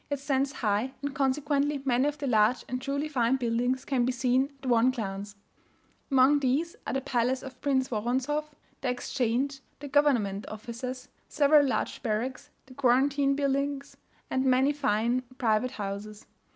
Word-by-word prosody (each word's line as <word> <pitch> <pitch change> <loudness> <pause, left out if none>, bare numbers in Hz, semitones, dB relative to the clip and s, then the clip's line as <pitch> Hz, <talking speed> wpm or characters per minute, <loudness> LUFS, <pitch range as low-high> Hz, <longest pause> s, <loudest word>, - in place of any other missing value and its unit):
It 285 -1 -2
stands 275 -1 0
high; 220 +2 -1
and 285 -1 -2
consequently 285 +1 0
many 255 +1 +2
of 295 0 -2
the 290 - -4
large 225 -1 +2
and 255 0 -4
truly 280 +3 -2
fine 255 -4 +1
buildings 245 +1 -1
can 260 -3 +1
be 250 - +1
seen 255 +2 +1
at - - -5
one 240 0 +4
glance. 205 -4 -4 0.7
Among 270 +1 +5
these 285 +6 0
are - - -2
the 270 - 0
Palace 250 0 0
of 260 -1 -10
Prince 265 -2 +1
Woronzoff, 265 +7 -1 0.3
the 260 - -1
Exchange, 250 +2 -1 0.2
the 290 - -8
government 245 -9 +2
offices, 245 +4 -6 0.2
several 290 -1 +4
large - - -2
barracks, 235 +4 -3 0.2
the 260 - -14
quarantine 275 +2 +2
buildings, 280 0 -1 0.4
and 260 - +1
many 265 +2 +3
fine 245 -3 +1 0.2
private 225 0 +1
houses. 205 0 -6
260 Hz, 155 wpm, -28 LUFS, 240-280 Hz, 0.7 s, Among